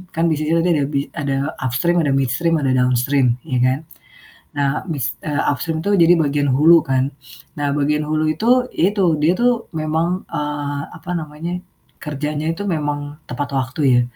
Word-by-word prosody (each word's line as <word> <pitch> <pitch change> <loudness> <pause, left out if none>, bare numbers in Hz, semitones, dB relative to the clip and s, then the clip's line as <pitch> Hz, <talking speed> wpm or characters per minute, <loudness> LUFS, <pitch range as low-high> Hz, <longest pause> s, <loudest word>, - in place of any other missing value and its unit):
Kan 165 +1 +2
bisnisnya 155 +2 +1
tadi 175 - +1
ada 145 -2 +1
bi 140 - +2 0.2
ada 140 -3 -1 0.3
upstream, 135 +8 +1
ada 145 - +1
midstream, 135 +6 +1
ada 135 -2 +1
downstream, 125 0 +2
ya 130 -4 0
kan. 130 +2 +2 0.8
Nah, 140 0 0
bis 140 -2 -2
eee, 150 -1 0
upstream 160 +3 -2
tuh 205 - +2
jadi 170 +1 +6
bagian 145 -2 +1
hulu 160 +5 +6
kan. 135 0 +1 0.5
Nah 145 -1 -1
bagian 150 +1 +1
hulu 155 0 +1
itu, 170 +9 -5 0.3
ya 185 +4 +3
itu 200 -3 +1 0.2
dia 160 +4 +4
tuh 245 +1 +4 0.2
memang, 160 +4 -1
eee, 145 -1 -3 0.2
apa 180 - -7
namanya, 155 +2 -6 0.5
kerjanya 150 0 -3
itu 165 - -7
memang 150 -4 -1 0.3
tepat 140 +3 -3
waktu 130 +3 -3
ya. 120 - +5
150 Hz, 170 wpm, -19 LUFS, 135-165 Hz, 0.8 s, jadi